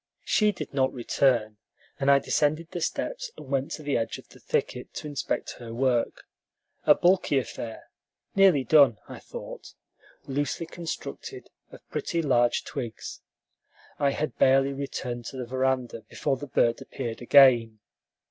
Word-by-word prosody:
She 210 -1 +3
did 190 - -7
not 130 -1 +2
return, 120 -3 +1 0.4
and 135 - +1
I 140 - +7
descended 155 +4 0
the 175 - -4
steps - - -3
and 135 - -11
went 135 0 0
to 155 - -7
the 145 -1 0
edge 115 -1 -2
of - - -15
the - - -16
thicket - - -2
to - - -6
inspect 145 -2 -3
her 115 -1 -8
work: 125 -2 0 0.6
a - - +7
bulky 180 -5 +3
affair, 120 -3 -5 0.4
nearly 190 -8 +5
done, 140 -6 +5
I - - -9
thought, - - -9 0.5
loosely 145 +4 -2
constructed 175 - -7 0.2
of - - -15
pretty 170 -2 -1
large 120 -4 +2
twigs. 115 -3 -6 0.8
I 140 -1 +3
had 150 +2 -3
barely 135 +1 +4
returned 125 -3 -5
to 130 - -7
the 125 - -4
veranda 130 -2 -1
before 135 - -1
the 145 - -7
bird 120 -2 +1
appeared 115 0 -6
again. 120 -4 +6
135 Hz, 150 wpm, -27 LUFS, 120-150 Hz, 0.8 s, I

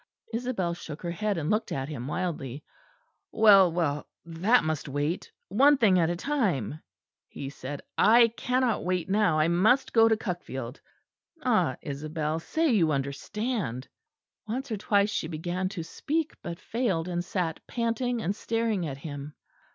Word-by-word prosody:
Isabel 230 -7 -1
shook 155 -2 -8
her 170 - -2
head 205 +2 -1
and 155 -2 -1
looked 215 +1 0
at 135 0 -2
him 135 -5 -5
wildly. 150 -5 -3 0.7
"Well, 200 -5 +7
well, 155 -4 -1 0.2
that 180 +9 +3
must 155 -2 -2
wait; 145 +5 -2 0.2
one 275 +8 +5
thing 200 -7 +4
at 165 -1 +3
a 175 - 0
time," 175 - -1 0.5
he 135 -1 -7
said. 140 0 -7 0.2
"I 230 +1 +7
cannot 250 +1 0
wait 180 0 -1
now. 200 -6 +3
I 155 +1 +3
must 215 +11 +3
go 225 -1 +6
to 220 -1 +3
Cuckfield. 135 - -5 0.6
Ah! - - +2
Isabel, 155 +2 -3
say 320 - 0
you 170 -9 +3
understand." 140 - -3 0.6
Once 255 +4 -4
or 215 - -1
twice 205 0 +2
she 160 - -2
began 175 +3 -2
to 180 -4 -5
speak, 310 - -2
but 170 0 -6
failed; 200 -9 -1
and 175 -1 -2
sat 175 -3 -2
panting 235 0 -1
and 195 +4 -1
staring 225 -6 -1
at 135 -2 -5
him. 145 0 -7
180 Hz, 155 wpm, -28 LUFS, 155-225 Hz, 0.7 s, Well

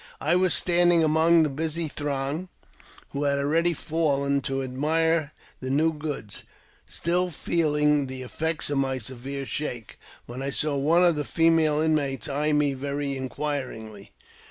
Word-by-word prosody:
I 155 +4 +1
was 185 0 +3
standing 175 -1 +4
among 160 +2 +4
the 155 - +1
busy 160 +3 -2
throng, 145 +4 -3 0.6
who 145 +1 -2
had 140 0 +2
already 165 +5 +2
fallen 140 -3 0
to 135 -1 -2
admire 155 +4 0 0.3
the 130 - -5
new 155 +4 +2
goods, 145 -9 -5 0.5
still 180 +2 0
feeling 150 -3 +1
the 130 0 -6
effects 160 +4 -1
of 140 - +1
my 135 -1 0
severe 130 +3 -5
shake, 125 -6 -5 0.3
when 125 +2 -7
I 135 - -2
saw 150 +1 -1
one 160 +6 +3
of 170 -2 +4
the 150 - -1
female 165 -2 +3
inmates 150 -4 0
eye 150 +2 0
me 150 -1 +2
very 140 +1 -3
inquiringly. 130 -7 -5
150 Hz, 150 wpm, -25 LUFS, 135-160 Hz, 0.6 s, standing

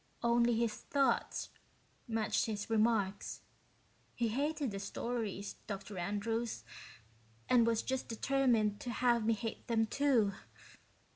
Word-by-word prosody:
Only 235 0 +4
his 230 -1 +1
thoughts 275 -1 0 0.6
matched 225 -1 +1
his 210 0 -4
remarks. 215 -3 +1 0.7
He 235 -1 +1
hated 285 +2 -1
the 200 - -4
stories, 205 -1 -3
Dr. 200 -1 -5
Andrews, 220 +5 -2 0.8
and 235 -2 +5
was 230 -1 +2
just 265 0 -2
determined 230 -4 +2
to 245 - -5
have 240 -1 +2
me 225 +1 +3
hate 220 +1 -5
them, 225 -1 +2
too. 240 -5 +3
230 Hz, 120 wpm, -34 LUFS, 210-240 Hz, 0.8 s, and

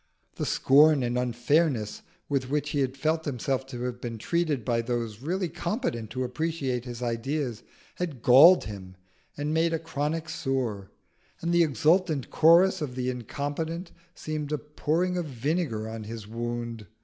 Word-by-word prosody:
The - - -2
scorn 145 0 +5
and 120 0 -1
unfairness 125 -1 +1 0.3
with 135 -3 -1
which 150 +1 -1
he 145 -2 +1
felt 155 +5 -1
himself 135 -1 -2
to 125 -2 -6
have 125 0 -4
been 115 -2 -5
treated 155 -1 -1
by 115 -2 +1
those 115 -2 -3
really 180 +6 -1
competent 170 - -3
to 130 +1 -3
appreciate 130 -2 -2
his 120 -1 -6
ideas 120 0 -2 0.4
had 155 -9 -4
galled 145 +9 +8
him 95 -3 -8 0.4
and 145 +1 -2
made 165 +1 +2
a - - +2
chronic 155 0 -3
sore; 125 -11 -2 0.5
and 170 +1 -1
the 175 - +5
exultant 155 - +2
chorus 175 +3 +5
of 135 -5 -4
the 130 0 -1
incompetent 145 - -4 0.2
seemed 155 -1 -4
a 150 - +1
pouring 160 +5 -1
of 175 - -1
vinegar 130 -3 -2
on 110 -1 -6
his 110 -1 -7
wound. 115 -1 -4
135 Hz, 155 wpm, -27 LUFS, 120-160 Hz, 0.5 s, galled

